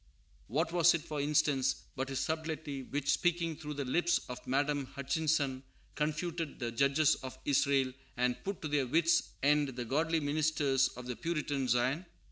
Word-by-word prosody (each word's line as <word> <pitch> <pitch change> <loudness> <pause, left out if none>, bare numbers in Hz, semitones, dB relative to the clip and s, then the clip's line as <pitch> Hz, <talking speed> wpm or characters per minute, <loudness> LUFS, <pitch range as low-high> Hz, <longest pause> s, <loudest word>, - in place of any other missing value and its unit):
What 160 +8 0
was 170 0 +5
it, 165 - -2
for 150 -2 -3
instance, 145 -2 +1
but 135 +1 -3
his 135 - -2
subtlety 160 -3 -3
which, 145 +2 -1
speaking 170 -2 +1
through 150 0 -6
the 140 -1 -3
lips 175 +7 +2
of 125 - -5
Madame 140 +1 +1
Hutchinson, 140 -1 0 0.3
confuted 155 +1 -2
the 120 -2 -3
"judges 140 +5 +3
of 130 -1 -7
Israel" 140 -2 +2 0.2
and 125 0 0
put 200 -3 -4
to - - -1
their 145 -3 +1
wits' 165 +5 +3
end 145 +1 +4
the 125 -1 -4
godly 160 +6 +1
ministers 145 -2 +2
of 125 - -7
the 125 -1 -4
Puritan 145 0 -2
Zion? 130 +9 +1
145 Hz, 165 wpm, -32 LUFS, 135-160 Hz, 0.3 s, was